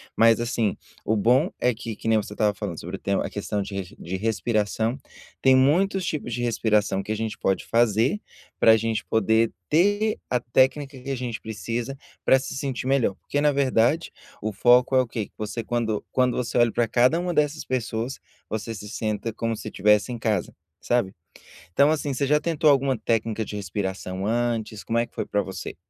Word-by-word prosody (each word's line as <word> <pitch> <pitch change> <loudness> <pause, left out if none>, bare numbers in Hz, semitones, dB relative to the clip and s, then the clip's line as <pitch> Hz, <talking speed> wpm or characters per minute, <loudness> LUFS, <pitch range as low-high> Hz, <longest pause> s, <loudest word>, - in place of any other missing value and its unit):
Mas 115 0 +5
assim, 115 -3 0 0.3
o 110 - +1
bom 125 - +3
é 125 -1 +2
que 110 -1 -6
que - - -7
nem 110 -1 +4
você 105 - -8
estava 105 -1 +1
falando 95 -5 -5
sobre 90 +3 -6
o - - -22
tema, 100 0 0
a - - -4
questão 105 0 -3
de 100 0 -6
de 90 +3 -5
respi 110 +2 -1
respiração, 110 +3 +1 0.4
tem 130 -1 +6
muitos 180 +8 +3
tipos 145 -7 -3
de 120 - -2
respiração 105 -4 +1
que 110 - -5
a - - 0
gente 110 0 -3
pode 95 - 0
fazer, 115 - +2 0.4
para 110 0 +7
gente 110 0 -1
poder 110 +1 +2 0.2
ter 205 +7 +2
a 125 - +1
técnica 130 +3 +1
que 135 +2 -8
a - - -1
gente 120 -3 -4
precisa 115 +5 -4 0.3
para 130 - +6
se 135 - -6
sentir 130 -2 -3
melhor 135 -8 +2
porque 145 - -3
na 150 -1 +4
verdade 140 +3 +2 0.3
o 110 +1 -2
foco 125 +5 +4
é 130 - +6
o 125 - -3
quê. 110 -2 -3
Que - - -35
você 110 +2 -4
quando 110 -2 -1
quando 125 -1 +2
você 125 0 -2
olha 120 -1 +4
para 120 -1 +1
cada 125 +9 +3
uma 175 0 -2
dessas 150 0 +1
pessoas, 120 0 -3 0.3
você 110 +1 -4
se 105 -1 -8
senta 110 +1 -2
como 115 0 -2
se - - -8
estivesse 105 +4 +2
em - - -4
casa, 105 -5 -1 0.3
sabe. 120 -5 0 0.6
Então, 140 +7 +5
assim, 145 -3 -1
você 140 +2 0
já 150 +1 +4
tentou 155 -1 +2
alguma 135 -1 +3
técnica 115 0 -1
de 105 - -7
respiração 95 -1 -4
antes, 115 -2 -1
como 115 - -1
é 120 - +1
que - - -36
foi - - -2
para 105 - 0
você? 95 0 -6
115 Hz, 205 wpm, -25 LUFS, 105-130 Hz, 0.6 s, para